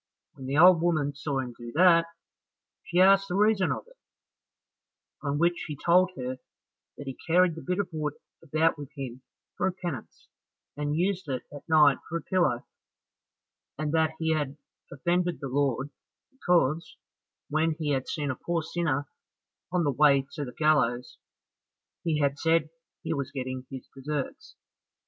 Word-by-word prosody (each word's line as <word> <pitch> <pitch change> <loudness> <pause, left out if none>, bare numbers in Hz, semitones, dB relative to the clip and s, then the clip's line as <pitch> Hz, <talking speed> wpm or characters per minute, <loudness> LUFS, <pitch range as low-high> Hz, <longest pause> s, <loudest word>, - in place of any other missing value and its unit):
When 130 - -9
the 140 +2 -1
old 175 0 +7
woman 155 -4 +1
saw 140 -1 -2
him 125 -2 -6
do 120 0 -9
that, 170 -1 +6 0.8
she 175 - 0
asked 195 +1 +6
the 180 - -3
reason 210 -2 +3
of - - -3
it, - - -22 1.2
on 145 -1 -1
which 170 +2 +1
he 150 - -5
told 180 +4 +4
her 130 -1 -5 0.6
that 145 - -8
he 135 - -4
carried 175 +1 +4
the 165 - -8
bit 180 0 -2
of 200 -2 0
wood 150 -2 -2 0.3
about 160 0 +1
with 145 -2 -7
him 130 -3 -6 0.3
for - - 0
a - - +1
penance, 175 -9 -7 0.5
and 145 +1 -2
used 185 -2 -1
it 130 -2 -2
at 145 +3 -11
night 150 -3 +6
for 170 - -1
a 165 - -8
pillow, 150 -10 +1 1.1
and 150 0 -2
that 160 -1 +2
he 160 0 +1
had 145 -2 -2 0.3
offended 175 +5 0
the 135 - -5
Lord, 140 0 0 0.4
because, 170 - +1 0.5
when 155 +1 +1
he 155 -3 -1
had 135 -2 -1
seen 145 -3 -2
a - - -4
poor 170 +4 -2
sinner 150 -4 -1 0.6
on 180 -1 +1
the 145 - +2
way 140 0 +4
to 150 - -4
the 125 - -6
gallows, 125 -5 +1 0.8
he 160 -2 +1
had 140 0 +1
said 165 -1 +2 0.3
he - - -1
was 140 -3 -3
getting 130 -1 -5
his 130 -2 -8
deserts. 140 +1 -5
155 Hz, 165 wpm, -28 LUFS, 140-170 Hz, 1.2 s, old